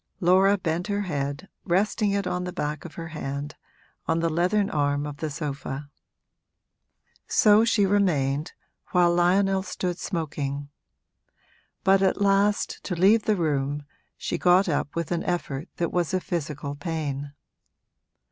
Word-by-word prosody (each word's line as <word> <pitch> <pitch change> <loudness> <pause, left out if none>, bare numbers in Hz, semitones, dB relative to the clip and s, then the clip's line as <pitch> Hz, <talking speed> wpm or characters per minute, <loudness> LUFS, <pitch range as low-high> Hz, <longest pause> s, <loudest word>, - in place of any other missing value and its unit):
Laura 190 +2 +4
bent 175 0 -2
her 205 0 -1
head, 145 -1 -3 0.2
resting 205 +4 +1
it 200 -1 0
on 180 0 -2
the 180 - -4
back 150 -2 -3
of 170 - -9
her 165 0 -6
hand, 145 -1 -5 0.5
on 165 +1 +1
the 165 0 0
leathern 185 +5 +2
arm 145 -1 0
of 145 -1 -6
the 155 +1 -3
sofa. 140 -1 -5 1.4
So 210 0 +5
she 230 -3 +3
remained, 155 -8 +1 0.4
while 175 -1 +4
Lionel 190 +2 +3
stood 180 -1 -3
smoking; 145 -5 -3 1.1
but 195 0 +4
at 190 +1 +2
last, 200 +1 +2
to 180 - -2
leave 205 +6 +4
the 215 - +3
room, 145 -4 -1 0.3
she - - -3
got 180 +2 +4
up 145 -2 -1
with 170 -2 -3
an 170 -1 0
effort 165 -3 -3
that 170 - -1
was 175 0 0
a - - +2
physical 150 -5 -4
pain. 145 -3 -4
170 Hz, 145 wpm, -25 LUFS, 145-190 Hz, 1.4 s, So